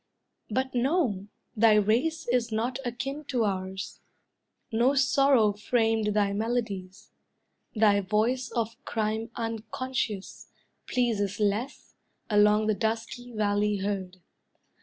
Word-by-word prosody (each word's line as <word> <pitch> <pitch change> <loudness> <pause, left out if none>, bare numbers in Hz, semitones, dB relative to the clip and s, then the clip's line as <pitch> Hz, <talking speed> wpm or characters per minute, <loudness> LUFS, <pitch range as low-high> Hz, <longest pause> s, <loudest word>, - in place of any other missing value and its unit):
But, 260 +4 -1
no, 245 - +1 0.3
thy 220 0 +5
race 230 +11 +1
is 240 -1 +1
not 240 +4 -1
akin 270 +4 -4
to 250 -5 0
ours; 190 -1 -4 0.7
No 240 +5 +3
sorrow 270 -5 +4
framed 220 0 +1
thy 200 -1 +2
melodies; 205 -4 -3 0.6
Thy 210 -2 +4
voice 225 +6 0
of 230 -1 -3
crime 220 +1 -2
unconscious, 225 -1 -4 0.4
pleases 215 -5 0
less, 215 +6 -2 0.4
Along 210 +1 +5
the 215 - +2
dusky 225 +3 -3
valley 210 -1 +1
heard. 190 -2 -3
220 Hz, 105 wpm, -28 LUFS, 205-245 Hz, 0.7 s, thy